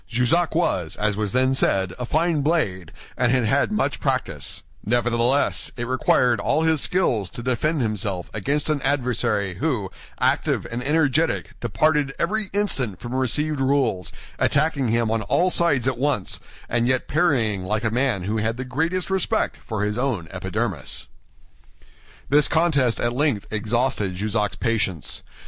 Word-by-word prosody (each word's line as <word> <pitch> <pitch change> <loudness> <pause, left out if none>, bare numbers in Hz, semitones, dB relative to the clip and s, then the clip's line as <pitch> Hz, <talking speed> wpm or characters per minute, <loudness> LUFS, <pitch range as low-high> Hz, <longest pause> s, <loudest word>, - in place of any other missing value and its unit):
Jussac 125 +9 +1
was, 90 - 0
as 105 -1 0
was 105 -1 -2
then 130 +2 +2
said, 95 -7 +1
a 125 - -3
fine 160 +1 +1
blade, 100 - 0 0.2
and 125 -2 +2
had 125 -3 +2
had 140 - +2
much 215 0 0
practice; - - -2 0.2
nevertheless 120 +3 +1
it 120 - -3
required 125 -2 +2
all 160 - +1
his 160 -2 +2
skill 170 - +1
to 115 +6 -8
defend 135 +5 0
himself 100 -4 -2
against 140 +7 -1
an 155 -2 0
adversary 120 -9 0
who, 125 -11 -1 0.3
active - - +1
and 120 +2 -3
energetic, 155 +2 +1
departed 135 +5 +1
every 210 +3 -1
instant 135 - -1
from 120 +1 -6
received 140 +3 0
rules, 130 -9 +1 0.3
attacking 145 -2 +2
him 115 0 +1
on 115 -1 0
all 180 - +2
sides 145 -9 +2
at 130 -2 -1
once, 135 -9 0 0.3
and 120 0 +1
yet 130 0 +1
parrying 125 - +1
like 105 +4 -2
a 110 - 0
man 120 -6 +1
who 105 +4 -1
had 115 +2 -1
the 130 - -4
greatest 165 +9 -1
respect 190 -2 0
for 110 -3 -3
his 105 +3 -2
own 120 -11 -1
epidermis. - - -3 1.2
This 145 +1 +5
contest 145 -7 +2
at 120 0 0
length 130 -6 0
exhausted 110 -2 0
Jussac's 105 +2 -1
patience. 100 - -1
125 Hz, 155 wpm, -23 LUFS, 110-150 Hz, 1.2 s, This